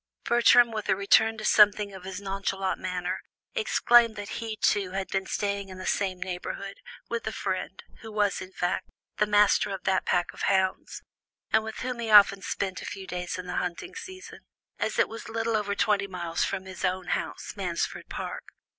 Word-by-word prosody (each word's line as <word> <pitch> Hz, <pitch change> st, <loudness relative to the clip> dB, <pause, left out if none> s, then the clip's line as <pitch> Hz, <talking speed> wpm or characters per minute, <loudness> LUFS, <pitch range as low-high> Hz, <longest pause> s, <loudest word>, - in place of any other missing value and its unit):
Bertram, 240 Hz, 0 st, +6 dB
with 215 Hz, -2 st, -4 dB
a 190 Hz, -, +5 dB
return 220 Hz, +3 st, +4 dB
to 215 Hz, -, -6 dB
something 210 Hz, -1 st, +5 dB
of 185 Hz, -1 st, -10 dB
his 190 Hz, 0 st, -5 dB
nonchalant 195 Hz, -1 st, -2 dB
manner, 180 Hz, 0 st, -3 dB, 0.3 s
explained 240 Hz, -, +4 dB
that 205 Hz, 0 st, -6 dB
he, 225 Hz, -2 st, -4 dB
too, 195 Hz, -3 st, +1 dB
had 195 Hz, 0 st, -2 dB
been 190 Hz, 0 st, -1 dB
staying 200 Hz, -1 st, -2 dB
in 185 Hz, -, -9 dB
the 185 Hz, -, -7 dB
same 190 Hz, -2 st, 0 dB
neighbourhood, 185 Hz, +2 st, -5 dB, 0.3 s
with 235 Hz, -1 st, -3 dB
a -, -, 0 dB
friend, 190 Hz, -2 st, -4 dB, 0.2 s
who 225 Hz, -2 st, -9 dB
was, 205 Hz, -2 st, +1 dB
in 185 Hz, 0 st, -8 dB
fact, 180 Hz, 0 st, -2 dB, 0.3 s
the 210 Hz, -, +2 dB
master 205 Hz, 0 st, +4 dB
of 195 Hz, -2 st, -5 dB
that 190 Hz, 0 st, +2 dB
pack 175 Hz, -1 st, +1 dB
of -, -, -10 dB
hounds, 190 Hz, -1 st, 0 dB, 0.5 s
and 220 Hz, 0 st, +4 dB
with 220 Hz, 0 st, -6 dB
whom 250 Hz, -1 st, -3 dB
he 230 Hz, -1 st, -3 dB
often 200 Hz, -2 st, +7 dB
spent 190 Hz, -1 st, -3 dB
a -, -, -7 dB
few 195 Hz, -, -6 dB
days 180 Hz, -1 st, -4 dB
in 180 Hz, -, -6 dB
the -, -, -4 dB
hunting 180 Hz, -, -3 dB
season, 380 Hz, -5 st, -9 dB, 0.4 s
as -, -, -1 dB
it -, -, +4 dB
was 225 Hz, 0 st, -8 dB
little 225 Hz, 0 st, -1 dB
over 205 Hz, -1 st, 0 dB
twenty 205 Hz, -2 st, +2 dB
miles 175 Hz, -3 st, -2 dB
from 190 Hz, -1 st, -2 dB
his 190 Hz, 0 st, -8 dB
own 185 Hz, -1 st, -1 dB
house, -, -, -3 dB
Mansfield -, -, -3 dB
Park. -, -, -5 dB
200 Hz, 195 wpm, -27 LUFS, 185-220 Hz, 0.5 s, often